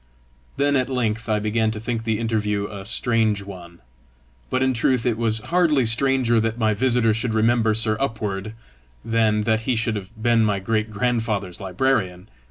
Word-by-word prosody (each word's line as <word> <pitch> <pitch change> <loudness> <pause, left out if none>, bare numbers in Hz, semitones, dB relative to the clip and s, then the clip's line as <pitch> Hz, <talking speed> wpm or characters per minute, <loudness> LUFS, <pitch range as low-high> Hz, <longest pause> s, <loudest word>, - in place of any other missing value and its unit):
Then 145 0 +2
at 130 -1 +1
length 115 -3 -2
I 110 - +2
began 110 +1 0
to 110 -1 -4
think 115 0 -4
the 110 -1 0
interview 105 -2 -1
a 100 -2 -9
strange 110 -2 +1
one. 90 -3 -11 0.7
But 130 - 0
in 130 0 +2
truth 125 +1 0
it 120 -3 +1
was 110 -1 +1
hardly 165 -4 +2
stranger 120 0 +2
that 115 +1 -1
my 110 -2 +1
visitor 120 -1 +2
should 110 +1 -2
remember 110 0 +2
Sir 110 -1 +2
Upward, 110 -5 -3 0.5
than 110 -2 +1
that 110 0 +1
he 125 - +2
should 115 0 -1
have 95 -2 -6
been 115 0 +3
my 105 -2 +1
great 110 +2 -1
grandfather's 110 -4 -2
librarian! 95 -2 -1
110 Hz, 175 wpm, -22 LUFS, 105-120 Hz, 0.7 s, been